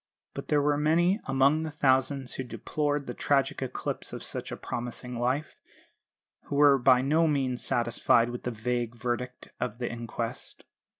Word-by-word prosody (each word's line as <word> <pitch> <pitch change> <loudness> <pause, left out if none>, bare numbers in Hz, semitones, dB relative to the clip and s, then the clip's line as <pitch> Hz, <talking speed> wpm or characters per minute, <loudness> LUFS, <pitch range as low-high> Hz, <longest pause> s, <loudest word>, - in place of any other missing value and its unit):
But - - -7
there 145 -1 +2
were 145 0 +2
many, 170 +6 +3
among 135 +3 +3
the 160 - -3
thousands 135 -2 +1
who 130 - -3
deplored 145 +3 -2
the 125 - -5
tragic 140 0 +1
eclipse 130 - -4
of - - -6
such - - -4
a - - -5
promising 120 0 -5
life, 130 +5 -1 0.9
who 145 - -4
were 140 -1 +6
by 125 0 +5
no 155 +5 +3
means 135 -4 0
satisfied 120 0 +2
with 120 - -6
the - - -3
vague 120 +1 -2
verdict 125 +1 -4
of - - -3
the 120 -1 -3
inquest. 115 -1 -6
130 Hz, 165 wpm, -28 LUFS, 120-145 Hz, 0.9 s, were